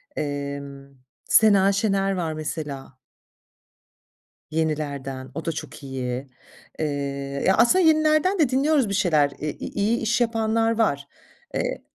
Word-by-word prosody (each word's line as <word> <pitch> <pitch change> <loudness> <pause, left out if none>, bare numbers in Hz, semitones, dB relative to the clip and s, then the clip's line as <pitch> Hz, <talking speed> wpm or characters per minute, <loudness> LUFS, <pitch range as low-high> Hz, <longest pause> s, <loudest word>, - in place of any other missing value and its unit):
Emm, 140 -1 -5 0.3
Sena 200 -3 +5
Şener 195 -1 +1
var 170 -4 -2
mesela 150 -3 -5 1.6
yenilerden, 145 -4 -3
o 160 - -5
da 165 - 0
çok 155 -2 -8
iyi. 130 -1 -4 0.5
Eee, 160 - 0 0.6
ya 190 - +5
aslında 360 +10 +5
yenilerden 310 +4 +3
de 300 -6 +4
dinliyoruz 270 -2 +2
bir - - -2
şeyler, 155 -8 +2
i 150 - -2
iyi 215 +3 -1
iş 235 +1 0
yapanlar 225 -1 +1
var. 140 -11 +1 0.5
Eee - - -2
170 Hz, 120 wpm, -24 LUFS, 140-225 Hz, 1.6 s, Sena